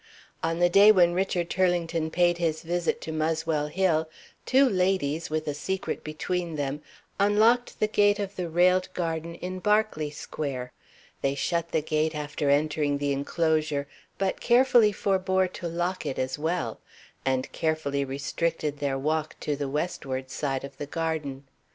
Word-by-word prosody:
On 165 0 -1
the 175 0 +4
day 200 +4 +7
when 175 -4 +4
Richard 180 -2 0
Turlington 170 -3 +1
paid 175 +1 +2
his 160 -2 -1
visit 175 +1 -1
to 160 - -5
Muswell 155 -1 0
Hill, 160 -2 +1 0.4
two 270 +1 +5
ladies 180 - 0
(with 155 0 -2
a 150 - 0
secret 190 +6 -3
between 170 +2 -3
them) 145 0 -3 0.4
unlocked 215 +5 +3
the - - +3
gate 205 -1 +3
of 200 -1 -4
the 180 -2 -3
railed 180 +2 +3
garden 165 -1 -3
in 185 +2 -5
Berkeley 210 -7 +1
Square. 140 -4 -5 0.5
They 135 0 0
shut 170 +3 -1
the 155 - 0
gate 155 0 0
after 145 -1 -2
entering 145 0 +2
the 145 0 -1
inclosure, 155 0 0 0.3
but 195 -1 -1
carefully 240 -3 +5
forbore 190 -1 +1
to 175 -1 -6
lock 175 0 -2
it 135 - -3
as 130 +2 -2
well, 165 +4 -2 0.4
and 130 -1 -1
carefully 155 -3 -1
restricted 145 +2 -2
their 140 -2 -1
walk 155 +2 -1
to 150 - -1
the 140 -1 -3
westward 135 -4 -3
side 135 -3 -2
of 140 0 -9
the 145 - -4
garden. 155 -4 -3
160 Hz, 155 wpm, -27 LUFS, 145-185 Hz, 0.5 s, day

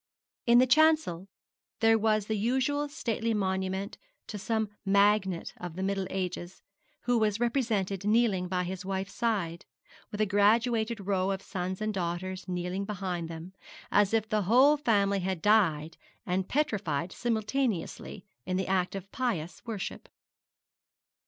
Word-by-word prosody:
In 235 0 +7
the 255 - +7
chancel 305 - +3 0.5
there 225 0 +5
was 215 -1 +2
the 220 - -1
usual 265 +7 0
stately 230 -5 -2
monument 190 0 -2 0.3
to 210 - -6
some 220 +1 -1
magnate 200 -2 +2
of 175 -2 -7
the 190 - -3
middle 195 -1 -1
ages, 180 -1 -4 0.4
who 245 -1 +1
was 215 -1 +1
represented 220 -6 0
kneeling 210 -4 +2
by 180 0 -1
his 185 +1 -5
wife's 190 0 -3
side, 195 -8 -2 0.4
with 205 - -7
a 215 - +3
graduated 220 +2 +2
row 190 -1 0
of 195 0 -2
sons 185 0 -4
and 215 0 -1
daughters 185 +1 -3
kneeling 180 +2 -2
behind 185 -4 -4
them, 165 +3 -8 0.4
as 205 -1 +4
if 220 -1 +1
the 215 -1 +1
whole 255 +9 +5
family 200 -8 +2
had 185 -1 -2
died 165 -6 +2 0.3
and 185 +1 -1
petrified 190 - -1
simultaneously, 230 -2 -2 0.2
in 185 0 -2
the 190 - -1
act 185 0 0
of 195 0 -7
pious 180 -11 -3
worship. 215 -5 -5
200 Hz, 145 wpm, -29 LUFS, 185-225 Hz, 0.5 s, In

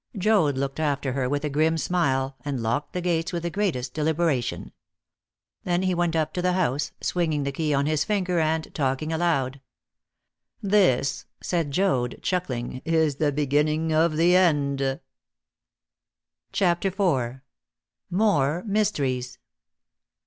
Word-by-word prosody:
Joad 185 -9 +2
looked 135 +2 -3
after 140 -4 -1
her 130 -1 -1
with 145 +2 -1
a - - -1
grim 160 +3 +2
smile, 135 -6 0
and 140 -3 -3
locked 120 +6 -1
the 180 - -2
gates 170 0 0
with 170 -2 -3
the 170 - -2
greatest 175 -11 -1
deliberation. 155 -4 -1 0.9
Then 175 0 0
he 185 -1 +1
went 175 -1 0
up 155 -1 0
to 180 - -2
the 180 0 +1
house, 145 -6 0
swinging 160 -5 0
the 140 - -2
key 155 +2 -1
on 140 0 +2
his 155 0 +1
finger 185 -5 0
and 160 0 -1
talking 140 +2 -1
aloud. 140 -6 0 1.0
"This," 180 - +2
said 165 -5 -1
Joad, 140 -7 0
chuckling, 130 -9 -2
"is 160 -3 +1
the 150 -1 +1
beginning 150 +3 +1
of 155 0 +2
the 175 +2 +4
end." 140 -6 +2 1.5
CHAPTER 175 0 +1
IV. 135 - 0 0.7
MORE 175 -5 +2
MYSTERIES. 140 - -1
155 Hz, 135 wpm, -25 LUFS, 140-175 Hz, 1.5 s, the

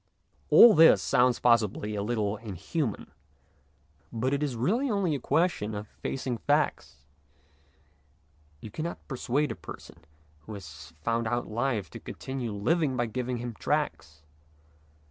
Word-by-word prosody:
All 235 -2 +9
this 160 +1 +7
sounds 125 0 +3
possibly 105 -3 +2
a 105 - -2
little 105 -1 -1
inhuman, 110 - -4 1.0
but 125 +4 -1
it 140 - 0
is 145 -4 -1
really 220 - 0
only 200 -7 +1
a 140 - -2
question 125 -9 0
of 105 +1 -6
facing 130 0 -4
facts. 145 - -1 1.6
You 110 - -9
cannot 160 +9 -6
persuade 135 +1 -1
a - - -4
person - - -11 0.4
who 80 +8 -9
has 80 -4 -11
found 115 0 0
out 120 +1 -1
life 110 -5 -2
to - - -8
continue 130 -4 -5
living 130 +7 0
by 120 - +1
giving 125 +2 -3
him 120 0 -5
tracts. 75 -6 -3
120 Hz, 135 wpm, -28 LUFS, 105-140 Hz, 1.6 s, All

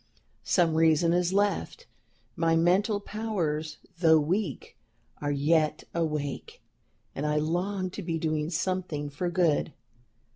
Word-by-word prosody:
Some 170 -3 +2
reason 160 +1 +3
is 175 0 +1
left, 205 - 0 0.5
my 165 -2 +2
mental 190 +6 +2
powers, 180 -8 -3 0.2
though 160 -2 +6
weak, 170 0 -2 0.5
are 145 - -1
yet 150 +2 +1
awake, 150 -4 -3 0.5
and 140 - -4
I 150 0 0
long 180 +5 -1
to 200 - -6
be 165 -2 -2
doing 155 -1 -1
something 170 -4 -2
for 175 +5 -2
good. 170 -4 +1
165 Hz, 120 wpm, -28 LUFS, 155-185 Hz, 0.5 s, though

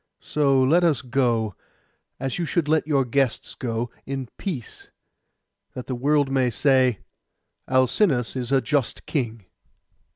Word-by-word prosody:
So 140 -2 +2
let 165 +7 +4
us 155 -6 +2
go, 120 -4 0 0.7
as 135 +4 -3
you 170 - 0
should 165 -2 0
let 155 0 +2
your 140 -4 +2
guests 130 -1 0
go, 120 -1 -3 0.2
in 135 -3 -4
peace; 150 - -6 0.9
that 125 - -6
the 130 - -4
world 140 +2 +1
may 130 -2 +2
say, 130 -2 +2 0.7
"Alcinous 130 - +2
is 125 -1 -3
a 135 -1 +4
just 145 -4 -1
king." 115 - -3
130 Hz, 135 wpm, -24 LUFS, 120-145 Hz, 0.9 s, let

